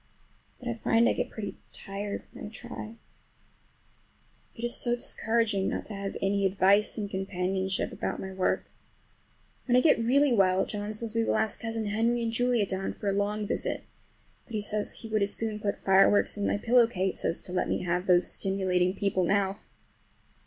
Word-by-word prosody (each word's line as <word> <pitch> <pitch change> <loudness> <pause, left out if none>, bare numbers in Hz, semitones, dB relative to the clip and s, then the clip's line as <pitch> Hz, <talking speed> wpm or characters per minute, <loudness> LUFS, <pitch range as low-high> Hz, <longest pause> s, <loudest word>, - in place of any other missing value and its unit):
But 250 - -9
I 240 - 0
find 230 +1 +2
I - - +3
get - - -2
pretty 205 -3 -6
tired 200 +1 -5
when - - -8
I - - -8
try. 225 0 -8 1.6
It 230 - -9
is 240 0 +3
so 240 -1 +2
discouraging 225 -4 0
not - - -3
to 220 - -7
have 195 0 -4
any 200 0 +1
advice 195 +2 +3
and 210 -2 -2
companionship 190 0 -2
about - - -3
my 190 - -5
work. 185 -1 -1 1.0
When 245 - +3
I - - +7
get 270 -4 +4
really 275 +3 +4
well 190 -3 +3
John 210 0 -4
says 225 0 -2
we 230 0 +1
will - - +1
ask 220 -1 0
Cousin 225 -1 -3
Henry 230 +3 +1
and 230 - -1
Julia 245 -2 +2
down 190 0 -3
for 205 - -3
a - - +1
long 205 +1 -1
visit; - - -2 0.6
but 235 - -8
he 210 - 0
says 210 0 -1
he 225 - -8
would 215 -1 0
as 200 0 +1
soon 220 -2 -2
put 205 -1 -2
fire 195 0 +5
works 205 - +2
in 205 -1 -1
my - - +1
pillow 235 +2 +4
case 190 -4 -2
as 165 - -1
to 180 - -3
let 185 - 0
me - - -1
have 180 +1 -1
those 180 -1 +5
stimulating 185 -2 0
people 200 -2 0
about 180 +3 +2 0.2
now. - - -24
205 Hz, 195 wpm, -28 LUFS, 195-225 Hz, 1.6 s, I